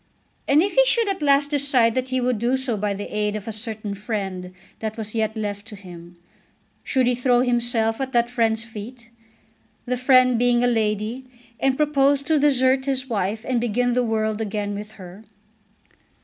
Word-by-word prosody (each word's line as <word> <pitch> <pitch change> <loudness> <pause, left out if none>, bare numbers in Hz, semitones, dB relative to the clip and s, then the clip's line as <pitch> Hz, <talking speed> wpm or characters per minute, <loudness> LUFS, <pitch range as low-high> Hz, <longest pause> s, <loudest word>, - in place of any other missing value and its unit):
And 295 +4 +5
if 400 - -2
he - - +6
should 465 -3 +2
at 385 -4 -3
last 285 0 +3
decide 270 -5 +2
that 255 +1 -2
he 260 0 0
would 250 -3 0
do 245 +4 +1
so 260 -3 -2
by 205 -1 -2
the 205 +1 -7
aid 210 0 0
of 215 +1 -6
a - - -2
certain 215 -1 -6
friend 195 -3 -4 0.3
that 220 0 -4
was 215 -1 -6
yet 220 -1 -1
left 205 -1 -4
to 210 - -9
him, 175 -3 -12 0.7
should 260 -3 +1
he 250 - +2
throw 245 0 +2
himself 240 -2 0
at 265 0 -3
that 235 -2 +2
friend's 225 -2 0
feet, 235 +2 -10 0.7
the 250 0 -1
friend 255 -1 +4
being 245 0 +3
a - - +3
lady, 220 +2 -1 0.3
and 270 -1 +1
propose 285 -2 +2
to 310 +1 +2
desert 265 -2 +3
his 265 -1 -1
wife 215 0 -2
and 245 -2 0
begin 240 +1 0
the 250 - +2
world 220 -2 -1
again 205 -1 -3
with 210 +1 -7
her? 190 0 -12
235 Hz, 190 wpm, -23 LUFS, 215-260 Hz, 0.7 s, he